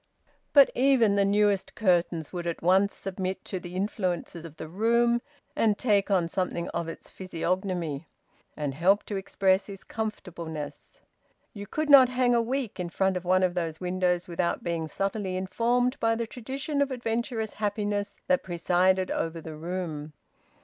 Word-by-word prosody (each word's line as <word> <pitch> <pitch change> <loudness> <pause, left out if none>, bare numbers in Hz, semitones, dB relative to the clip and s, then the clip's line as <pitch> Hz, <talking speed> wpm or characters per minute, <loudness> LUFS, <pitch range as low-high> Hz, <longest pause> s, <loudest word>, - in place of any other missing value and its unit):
But 280 -2 +7
even 245 -5 +4
the 200 - +4
newest 200 -1 +2
curtains 175 -5 +1
would 175 -1 -4
at 170 - -4
once 190 +3 +3
submit 190 0 -4
to 190 - -3
the 175 0 -9
influence 185 -2 -2
of 165 -2 -9
the 160 - -6
room, 235 +6 +2 0.3
and 220 -8 +2
take 205 -4 +2
on 185 -4 +2
something 170 -1 -2
of 170 - -3
its 165 - -9
physiognomy, 180 -4 -2 0.5
and 145 -2 -2
help 185 +8 +3
to 205 - -5
express 195 0 +1
its 195 -1 -9
comfortableness. 170 -8 -6 0.5
You 200 -1 -8
could 310 +7 -2
not 270 -3 +8
hang 250 -1 +2
a 235 - +4
week 245 -3 -3
in 175 -1 -2
front 190 +2 +1
of 180 0 -4
one 185 +1 +3
of 180 -1 +2
those 165 -3 -3
windows 180 -1 0
without 170 0 -1
being 165 -2 -2
subtly 195 +3 -2
informed 240 +7 +1
by 225 0 +2
the 230 0 -2
tradition 270 +5 -3
of 280 - +2
adventurous 235 -2 -2
happiness 205 -1 -2
that 180 - +2
presided 185 +1 +1
over 165 0 -2
the 160 -1 -8
room. 160 -2 -5
190 Hz, 165 wpm, -27 LUFS, 175-220 Hz, 0.5 s, not